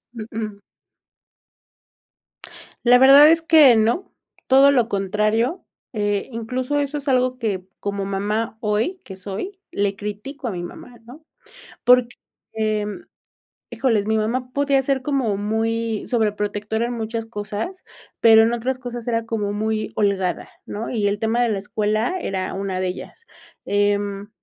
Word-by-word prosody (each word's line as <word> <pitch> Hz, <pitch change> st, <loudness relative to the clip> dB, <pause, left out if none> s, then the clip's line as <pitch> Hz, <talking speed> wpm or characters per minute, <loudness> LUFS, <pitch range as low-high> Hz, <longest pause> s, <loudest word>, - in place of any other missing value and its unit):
Uh-uh. 215 Hz, -2 st, -6 dB, 2.3 s
La 245 Hz, +1 st, +7 dB
verdad 275 Hz, +3 st, +9 dB
es 330 Hz, +1 st, +4 dB
que 310 Hz, -6 st, +7 dB
no, 230 Hz, -, +1 dB, 0.4 s
todo 270 Hz, +2 st, +6 dB
lo 245 Hz, -5 st, +2 dB
contrario. 215 Hz, -, 0 dB, 0.3 s
Eh, 205 Hz, 0 st, -1 dB
incluso 250 Hz, +5 st, -2 dB
eso 285 Hz, +1 st, -2 dB
es 290 Hz, 0 st, -8 dB
algo 255 Hz, -1 st, +2 dB
que, 200 Hz, -6 st, -2 dB
como 200 Hz, -1 st, -3 dB
mamá 210 Hz, +3 st, -2 dB
hoy, 220 Hz, -, -1 dB
que 190 Hz, -, -9 dB
soy, 205 Hz, -, -6 dB
le 200 Hz, -1 st, -1 dB
critico 210 Hz, +7 st, -6 dB
a -, -, -2 dB
mi 180 Hz, -2 st, -5 dB
mamá, 240 Hz, +7 st, -10 dB
¿no? 280 Hz, +7 st, -14 dB, 0.6 s
Porque, 245 Hz, -1 st, +4 dB, 1.5 s
híjole, 220 Hz, -6 st, 0 dB
mi 220 Hz, 0 st, +1 dB
mamá 250 Hz, +4 st, -2 dB
podía 280 Hz, 0 st, +2 dB
ser 270 Hz, 0 st, 0 dB
como 255 Hz, -7 st, 0 dB
muy 225 Hz, +1 st, -2 dB
sobre 220 Hz, -4 st, +1 dB
protectora 210 Hz, +2 st, -2 dB
en 240 Hz, -, -4 dB
muchas 225 Hz, -1 st, -4 dB
cosas, 220 Hz, -, -5 dB, 0.4 s
pero 225 Hz, -1 st, +7 dB
en 225 Hz, +1 st, +2 dB
otras 250 Hz, +2 st, -2 dB
cosas 245 Hz, -2 st, -7 dB
era 230 Hz, -1 st, 0 dB
como 210 Hz, -3 st, -2 dB
muy 215 Hz, +1 st, -2 dB
holgada, 195 Hz, -3 st, 0 dB, 0.2 s
¿no? 215 Hz, +2 st, -5 dB
Y 215 Hz, -4 st, 0 dB
el 200 Hz, 0 st, -1 dB
tema 225 Hz, +2 st, +1 dB
de 240 Hz, -, +2 dB
la 210 Hz, -3 st, -1 dB
escuela 215 Hz, -, -1 dB
era 190 Hz, -, -3 dB
una 195 Hz, -1 st, -3 dB
de 185 Hz, -, 0 dB
ellas. 190 Hz, -, -8 dB, 0.4 s
Em, 205 Hz, 0 st, 0 dB
225 Hz, 145 wpm, -22 LUFS, 205-250 Hz, 2.3 s, verdad